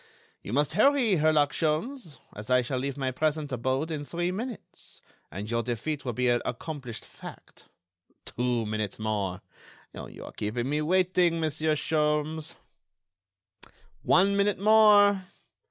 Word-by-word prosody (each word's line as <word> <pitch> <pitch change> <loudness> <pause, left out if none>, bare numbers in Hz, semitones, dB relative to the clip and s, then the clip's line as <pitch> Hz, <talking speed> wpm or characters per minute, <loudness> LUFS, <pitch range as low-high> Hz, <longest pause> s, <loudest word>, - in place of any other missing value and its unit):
You - - -8
must 145 +4 +1
hurry, 245 -4 +3
Herlock 150 -2 +3
Sholmes, 165 - -2 0.2
as 105 +4 -9
I 125 0 +4
shall 130 +1 -2
leave 140 +1 -3
my 130 -2 -1
present 155 +1 -1
abode 130 +5 -1
in 150 -2 -3
three 175 +4 -2
minutes, 230 +5 -7 0.3
and 105 +4 -6
your 115 0 +1
defeat 125 +6 -3
will 125 - -3
be 125 +3 0
an 120 0 +2
accomplished 125 -3 -6
fact.... - - -13 0.6
Two 120 -2 -1
minutes 105 -2 -3
more! 100 -4 -2 0.5
you - - -9
are - - -9
keeping 120 +4 -3
me 150 +1 0
waiting, 180 0 +2
Monsieur 155 0 0
Sholmes.... 150 +1 -1 1.5
One 195 +2 +3
minute 200 0 +2
more! 205 -2 +5
150 Hz, 140 wpm, -27 LUFS, 125-180 Hz, 1.5 s, more